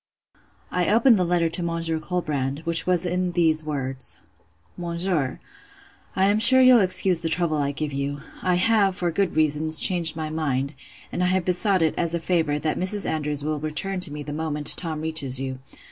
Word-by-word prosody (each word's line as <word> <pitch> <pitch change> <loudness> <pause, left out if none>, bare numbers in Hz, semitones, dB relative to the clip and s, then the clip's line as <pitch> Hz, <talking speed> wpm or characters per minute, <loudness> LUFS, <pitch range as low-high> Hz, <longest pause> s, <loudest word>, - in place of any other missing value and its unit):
I 180 +1 -1
opened 230 0 +3
the - - +1
letter 175 -1 0
to 165 +2 0
Monsieur 165 -1 -3
Colbrand; 150 -5 -4
which 170 +1 +2
was 180 -1 +2
in 180 0 -2
these 160 -2 +1
words:— 135 -3 -2 0.6
'MONSIEUR, 170 -5 -3 0.8
'I 190 - +2
am 205 +2 +2
sure 260 +4 +10
you'll 255 -2 +6
excuse 185 -1 +4
the 165 -1 -3
trouble 160 -2 +1
I 140 -1 -2
give 145 0 -5
you. 140 +1 -4 0.2
I 180 -1 0
have, 195 0 +1
for 175 -1 -2
good 185 -1 -2
reasons, 155 0 +2
changed 170 -2 +2
my 155 -1 -6
mind; 140 -3 -3 0.4
and - - -4
I 180 - +1
have 185 -1 -1
besought 185 0 +1
it, 160 - 0
as 170 -1 -1
a - - -2
favour, 160 -3 -1
that 155 +1 -3
Mrs. 195 +3 +3
Andrews 150 -2 -3
will 155 0 -3
return 155 +6 -4
to 175 -4 0
me 150 0 -7
the 145 - -8
moment 150 -1 -1
Tom 160 -3 -5
reaches 150 -5 -1
you. 130 -1 -6
165 Hz, 190 wpm, -22 LUFS, 150-180 Hz, 0.8 s, sure